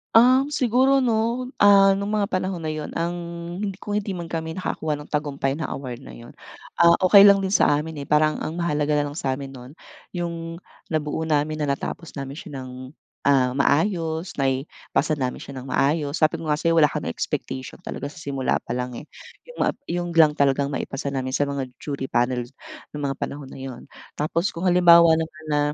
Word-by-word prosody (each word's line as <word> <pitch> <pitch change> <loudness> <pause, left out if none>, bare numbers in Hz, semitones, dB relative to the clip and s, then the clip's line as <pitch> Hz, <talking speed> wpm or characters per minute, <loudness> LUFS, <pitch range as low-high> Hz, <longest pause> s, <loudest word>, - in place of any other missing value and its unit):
Um 255 +4 +6
siguro 260 0 +3
no 235 +3 0
ah 195 -1 +7
nung 200 +1 -2
mga 205 - +2
panahon 185 -2 -2
na 155 - -1
yun 155 -1 -5
ang 170 +1 -1 0.5
hindi 195 -2 -3
kung 205 - -6
hindi 205 0 -1
man 170 - -5
kami 160 +1 -4
nakakuha 155 -4 -2
ng 150 - -9
tagumpay 145 -3 -1
na 155 +2 -4
award 130 -2 -6
na - - -11
yun 120 0 -13 0.5
ah, 170 0 +7
okey 195 +2 +8
lang 200 0 +8
din 190 - -2
sa 145 -7 +4
amin 160 +2 -4
eh. 140 - -8
Parang 155 0 +3
ang 165 +2 -4
mahalaga 150 -3 0
nalang 145 0 -1
sa 130 -3 -2
amin 135 -1 -8
nun 125 0 -11 0.4
yung 170 -1 -5 0.3
nabuo 155 0 -2
namin 155 0 0
na 145 - 0
natapos 150 +4 -4
namin 135 0 -5
siya 145 -2 -8
ng 130 -1 -7 0.6
ah, 130 -3 +4
maayos, 160 +4 +1
naipasa 135 +2 -1
namin 130 -4 -3
siya 135 -2 -8
ng 130 - -9
maayos. 145 +1 +1
Sabi 160 +1 +3
ko 165 - -6
nga 150 - +2
sa'yo 165 +1 +1
wala 150 - +6
kaming 80 - -3
expectation 130 0 -4
talaga 140 - -5
sa - - -15
simula 140 -4 -1
pa - - -7
lang 125 -1 -3
eh. 145 - -8 0.4
Yung - - -13 0.3
yun 175 0 -3
lang 160 -2 +7
talagang 140 0 +2
maipasa 140 0 -4
namin 130 -1 -2
sa - - +2
mga 140 -2 -3 0.2
jury 140 -2 -4
panel 120 -1 0 0.5
ng 150 - -4
mga 135 -1 -1
panahon 140 -2 -5
na - - -10
yun. 130 -2 -8 0.3
Tapos 165 +5 0
kung 165 - -5
halimbawa 170 -2 +6
naman 160 0 -6
na 150 - +2
155 Hz, 195 wpm, -23 LUFS, 140-175 Hz, 0.6 s, okey